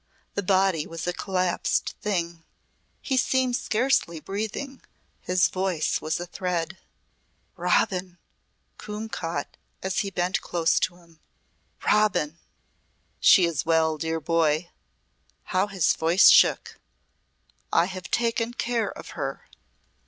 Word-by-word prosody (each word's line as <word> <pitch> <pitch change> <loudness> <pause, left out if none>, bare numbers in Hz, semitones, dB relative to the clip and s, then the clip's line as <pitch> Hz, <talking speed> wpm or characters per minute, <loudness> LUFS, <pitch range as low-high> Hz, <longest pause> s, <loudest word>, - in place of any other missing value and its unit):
The 200 - -1
body 190 -4 +2
was 165 -1 -6
a 180 - -1
collapsed 185 -2 -1
thing. 170 -5 -2 0.6
He 265 - 0
seemed 255 -1 +2
scarcely 235 - 0
breathing, 220 - -5 0.4
his 180 0 +2
voice 185 -4 -1
was 155 +2 -2
a 175 - -4
thread. 180 0 -3 0.8
"Robin!" 180 -1 0 0.6
Coombe 210 +1 -6
caught 165 -5 -4 0.3
as 190 0 -1
he 200 - -1
bent 180 -1 -1
close 165 -1 +1
to 175 - -1
him. 170 -2 -21 0.7
"Robin!" 185 -7 +2 0.8
"She 185 - +6
is 165 -6 -1
well, 160 -1 +2
dear 160 0 -2
boy!" 165 0 +1 0.7
How 190 +1 0
his 195 -5 +2
voice 170 +5 +5
shook! - - +4 0.9
"I - - +4
have 185 0 -7
taken 235 0 0
care 235 -5 -1
of - - -10
her." 135 -3 -5
180 Hz, 120 wpm, -25 LUFS, 165-205 Hz, 0.9 s, She